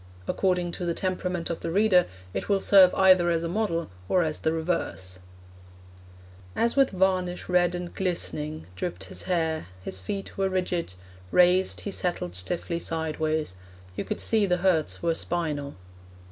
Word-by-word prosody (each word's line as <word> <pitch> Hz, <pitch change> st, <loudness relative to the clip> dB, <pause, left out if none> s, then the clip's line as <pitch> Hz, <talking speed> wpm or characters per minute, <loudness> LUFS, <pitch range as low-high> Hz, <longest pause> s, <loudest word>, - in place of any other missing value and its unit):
According 180 Hz, -2 st, +1 dB
to 180 Hz, -, -5 dB
the 170 Hz, -, 0 dB
temperament 180 Hz, -2 st, -2 dB
of 165 Hz, -, -4 dB
the 170 Hz, -, -4 dB
reader, 190 Hz, 0 st, +4 dB, 0.3 s
it -, -, -4 dB
will 200 Hz, -1 st, +3 dB
serve 190 Hz, -2 st, +7 dB
either 185 Hz, -2 st, +5 dB
as 165 Hz, -1 st, +1 dB
a -, -, -1 dB
model 170 Hz, -, -1 dB, 0.2 s
or 180 Hz, -, +3 dB
as 155 Hz, -1 st, -2 dB
the 160 Hz, -, 0 dB
reverse: 160 Hz, -, -2 dB, 1.4 s
As 235 Hz, +1 st, +1 dB
with 275 Hz, -1 st, +5 dB
varnish 185 Hz, -1 st, 0 dB
red 180 Hz, -1 st, +2 dB
and 175 Hz, 0 st, -5 dB
glistening 155 Hz, -4 st, -2 dB
Dripped 175 Hz, -, -4 dB
his -, -, -7 dB
hair; 160 Hz, -, 0 dB, 0.2 s
his 95 Hz, 0 st, -5 dB
feet 195 Hz, -, -5 dB
were 195 Hz, 0 st, +2 dB
rigid; 180 Hz, -, -2 dB, 0.3 s
Raised, 180 Hz, -, +3 dB
he 200 Hz, -, -4 dB
settled 175 Hz, -, -1 dB
stiffly 170 Hz, -, -2 dB
sideways: 155 Hz, -, -2 dB, 0.4 s
You -, -, -2 dB
could 215 Hz, -, -4 dB
see 215 Hz, -3 st, +2 dB
the 180 Hz, -1 st, +2 dB
hurts 165 Hz, -5 st, +1 dB
were 170 Hz, -1 st, +2 dB
spinal. 155 Hz, -4 st, -2 dB
175 Hz, 160 wpm, -26 LUFS, 160-185 Hz, 1.4 s, serve